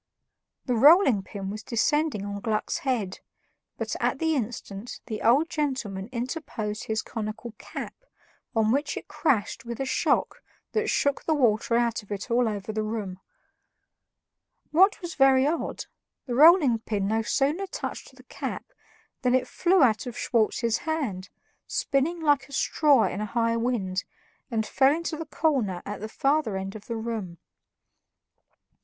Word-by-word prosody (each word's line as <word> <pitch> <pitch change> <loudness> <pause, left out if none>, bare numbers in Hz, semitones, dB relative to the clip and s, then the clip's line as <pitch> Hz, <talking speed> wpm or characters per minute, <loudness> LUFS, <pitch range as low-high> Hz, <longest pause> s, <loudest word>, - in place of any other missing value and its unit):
The 250 - 0
rolling 275 - +6
pin 195 0 -6
was 215 +1 -6
descending 260 -1 0
on 200 0 -4
Gluck's 215 +1 -1
head, 230 -8 -2 0.6
but, - - -3
at - - 0
the 320 -1 +1
instant, 225 -3 -5
the 215 -3 -5
old 270 +8 +4
gentleman 255 -11 -3
interposed 235 -4 -4
his 220 0 -1
conical 220 +1 -5
cap, - - -7 0.6
on 220 -1 +3
which 285 +4 0
it - - -7
crashed 240 -11 0
with 235 -1 -6
a 270 - -1
shock 265 - 0 0.3
that 435 0 0
shook 285 -1 +1
the 315 - +2
water 230 -4 +2
out 235 -1 +1
of 205 - -18
it 205 +4 -5
all 240 -1 +3
over 205 0 -4
the 215 - -1
room. 215 -4 -4 1.5
What 380 +6 +5
was 345 -1 -4
very 270 -1 +5
odd, 320 +3 -2 0.4
the 250 - -4
rolling 295 -3 +6
pin 205 -3 -2
no 220 +2 +1
sooner 295 - 0
touched - - -6
the - - -16
cap - - -5 0.6
than 250 -1 +3
it 255 -1 +1
flew 365 +2 +3
out 225 -1 +2
of 245 - -6
Schwartz's 230 0 +1
hand, 250 - -3 0.4
spinning 295 +5 0
like 290 -3 +2
a - - -12
straw 280 -3 +3
in 205 - -2
a 215 - -2
high 230 0 +2
wind, 220 -6 -1 0.5
and 225 -3 -1
fell 270 +5 +3
into 335 -1 -3
the 320 0 -6
corner 255 - 0
at 205 - -6
the 215 - -5
further 275 -4 +1
end 195 +1 -5
of 215 0 -10
the 230 - -3
room. 220 -6 -4
235 Hz, 160 wpm, -26 LUFS, 215-285 Hz, 1.5 s, rolling